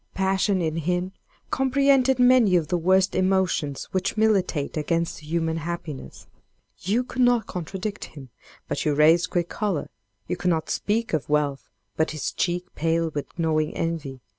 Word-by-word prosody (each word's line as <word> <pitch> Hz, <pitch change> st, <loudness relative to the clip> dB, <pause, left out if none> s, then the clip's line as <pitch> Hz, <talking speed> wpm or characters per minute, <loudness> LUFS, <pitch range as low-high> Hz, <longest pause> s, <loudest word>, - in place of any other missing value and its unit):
Passion, 190 Hz, 0 st, +1 dB
in 160 Hz, 0 st, -1 dB
him, 180 Hz, +3 st, -1 dB, 0.4 s
comprehended 265 Hz, -1 st, +3 dB
many 245 Hz, -6 st, +5 dB
of 160 Hz, -4 st, +1 dB
the 175 Hz, -, +1 dB
worst 185 Hz, +2 st, +3 dB
emotions 185 Hz, -7 st, 0 dB
which 190 Hz, +3 st, -1 dB
militate 195 Hz, -9 st, +1 dB
against 165 Hz, +2 st, -1 dB
human 160 Hz, +1 st, -2 dB
happiness. 165 Hz, -3 st, -6 dB, 0.5 s
You 215 Hz, +7 st, 0 dB
could 250 Hz, 0 st, -4 dB
not 245 Hz, -2 st, +4 dB
contradict 190 Hz, +4 st, -5 dB
him, 135 Hz, -5 st, -12 dB, 0.4 s
but -, -, -2 dB
you 150 Hz, -2 st, +1 dB
raised 165 Hz, +4 st, +4 dB
quick 175 Hz, -1 st, 0 dB
choler; 200 Hz, -9 st, -2 dB, 0.4 s
you 180 Hz, -, -2 dB
could 180 Hz, -, 0 dB
not 160 Hz, -2 st, 0 dB
speak 225 Hz, 0 st, -1 dB
of 150 Hz, -2 st, -1 dB
wealth, 145 Hz, -2 st, 0 dB, 0.3 s
but 160 Hz, -1 st, +2 dB
his -, -, -2 dB
cheek 175 Hz, 0 st, -1 dB
paled 165 Hz, 0 st, 0 dB
with 145 Hz, +2 st, -6 dB
gnawing 155 Hz, -2 st, 0 dB
envy. 155 Hz, -6 st, -3 dB
175 Hz, 155 wpm, -24 LUFS, 155-195 Hz, 0.5 s, many